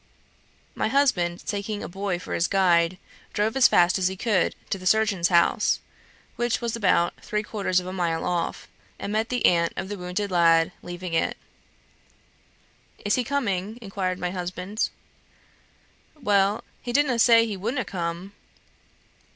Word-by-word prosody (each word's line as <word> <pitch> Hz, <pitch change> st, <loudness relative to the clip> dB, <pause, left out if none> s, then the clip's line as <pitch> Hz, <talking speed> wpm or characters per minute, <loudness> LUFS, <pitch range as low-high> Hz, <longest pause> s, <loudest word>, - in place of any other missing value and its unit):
My -, -, -1 dB
husband 195 Hz, -10 st, +1 dB
taking 205 Hz, 0 st, -3 dB
a -, -, -4 dB
boy 190 Hz, 0 st, -3 dB
for 175 Hz, -, -7 dB
his 170 Hz, -, +1 dB
guide, 180 Hz, -2 st, +3 dB, 0.4 s
drove 215 Hz, +2 st, 0 dB
as 265 Hz, -2 st, +7 dB
fast 175 Hz, +2 st, +3 dB
as 185 Hz, -, +2 dB
he 190 Hz, -, -3 dB
could 205 Hz, -4 st, +1 dB, 0.2 s
to 195 Hz, -, -1 dB
the 185 Hz, -, -4 dB
surgeon's 205 Hz, -4 st, +3 dB
house, 170 Hz, -1 st, +3 dB, 0.6 s
which 240 Hz, -1 st, 0 dB
was 235 Hz, -1 st, -2 dB
about 180 Hz, -5 st, +2 dB
three 210 Hz, 0 st, -2 dB
quarters 200 Hz, -4 st, 0 dB
of 180 Hz, -, -8 dB
a 185 Hz, -, -5 dB
mile 170 Hz, -3 st, -1 dB
off, 175 Hz, -1 st, -2 dB, 0.3 s
and 200 Hz, -, -5 dB
met 220 Hz, +2 st, 0 dB
the 245 Hz, -1 st, 0 dB
aunt 170 Hz, -1 st, +3 dB
of 190 Hz, -, -4 dB
the 205 Hz, -2 st, -5 dB
wounded 180 Hz, +3 st, -3 dB
lad 165 Hz, -2 st, +4 dB
leaving 175 Hz, 0 st, -7 dB
it. 165 Hz, -, 0 dB, 1.7 s
"Is 205 Hz, -, +2 dB
he 255 Hz, -, +2 dB
coming?" 220 Hz, -6 st, -2 dB
inquired 195 Hz, -4 st, -3 dB
my 180 Hz, -1 st, -3 dB
husband. 180 Hz, +3 st, -3 dB, 1.3 s
"Well, 205 Hz, -3 st, +2 dB, 0.2 s
he 240 Hz, -, -4 dB
didna' 265 Hz, -2 st, +2 dB
say 230 Hz, -1 st, +6 dB
he 215 Hz, -3 st, -4 dB
wouldna' 235 Hz, +7 st, -2 dB
come." 175 Hz, +2 st, -4 dB
195 Hz, 155 wpm, -25 LUFS, 180-220 Hz, 1.7 s, as